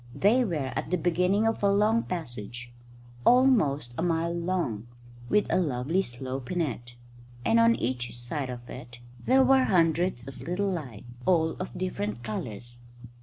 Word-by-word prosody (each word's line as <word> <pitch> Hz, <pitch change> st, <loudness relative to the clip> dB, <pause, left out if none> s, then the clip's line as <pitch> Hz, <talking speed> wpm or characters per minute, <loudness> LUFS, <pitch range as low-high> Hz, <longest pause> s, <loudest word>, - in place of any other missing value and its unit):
They 230 Hz, +6 st, +4 dB
were 155 Hz, -, -2 dB
at -, -, -3 dB
the 180 Hz, -, +1 dB
beginning 180 Hz, +5 st, +2 dB
of 225 Hz, -, 0 dB
a 200 Hz, -1 st, +3 dB
long 215 Hz, +3 st, +3 dB
passage, 120 Hz, -, -6 dB, 0.5 s
almost 180 Hz, -, +4 dB
a -, -, +1 dB
mile 170 Hz, 0 st, 0 dB
long, 170 Hz, -, -2 dB, 0.4 s
with 210 Hz, -, +3 dB
a -, -, +3 dB
lovely 145 Hz, +4 st, 0 dB
slope 130 Hz, -1 st, -6 dB
in 180 Hz, -, -1 dB
it; 120 Hz, -6 st, -3 dB, 0.5 s
and 230 Hz, -, +4 dB
on 230 Hz, 0 st, +5 dB
each 120 Hz, 0 st, -3 dB
side 130 Hz, +3 st, -4 dB
of 120 Hz, -1 st, -7 dB
it 120 Hz, -1 st, -10 dB, 0.2 s
there 265 Hz, +1 st, +5 dB
were 265 Hz, 0 st, +5 dB
hundreds 165 Hz, -6 st, +1 dB
of 135 Hz, -, -9 dB
little 195 Hz, +3 st, -1 dB
lights, 120 Hz, -, -7 dB
all 165 Hz, -3 st, +3 dB
of 185 Hz, -, -6 dB
different 120 Hz, -, -3 dB
colours. 120 Hz, +1 st, -6 dB
160 Hz, 160 wpm, -27 LUFS, 120-190 Hz, 0.5 s, on